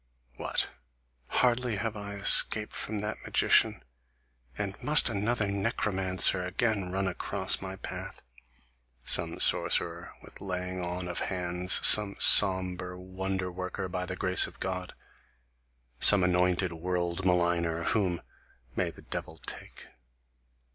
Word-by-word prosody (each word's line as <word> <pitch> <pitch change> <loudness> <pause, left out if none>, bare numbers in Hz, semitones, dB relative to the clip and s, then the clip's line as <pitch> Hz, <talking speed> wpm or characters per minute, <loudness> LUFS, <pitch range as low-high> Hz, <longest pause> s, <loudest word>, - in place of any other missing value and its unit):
What! - - -3 0.6
Hardly 125 -2 0
have 110 +2 -5
I 100 -1 -8
escaped 105 +2 +4
from 105 -1 -6
that 105 0 -6
magician, - - 0 0.7
and 100 -2 -4
must 150 +1 +6
another 105 +1 -2
necromancer 95 -3 +3
again 95 0 -3
run 95 +1 -2
across 90 - -2
my 95 0 -8
path, - - -9 0.8
Some - - -1
sorcerer 85 0 +2
with - - -14
laying 90 -1 -5
on 90 +1 -5
of 90 - -5
hands, 90 0 +1
some 105 -2 +8
sombre 90 -2 +2
wonder 95 0 -5
worker 90 +1 -7
by 90 0 -5
the 95 - -5
grace 90 -1 +1
of - - -16
God, 90 -1 -5 1.1
some 100 -3 +8
anointed 90 0 -1
world 85 +1 -4
maligner, 85 -2 -1
whom, 95 -6 -2 0.5
may - - -2
the - - -15
devil 80 - -8
take! - - -10
95 Hz, 120 wpm, -27 LUFS, 90-100 Hz, 1.1 s, some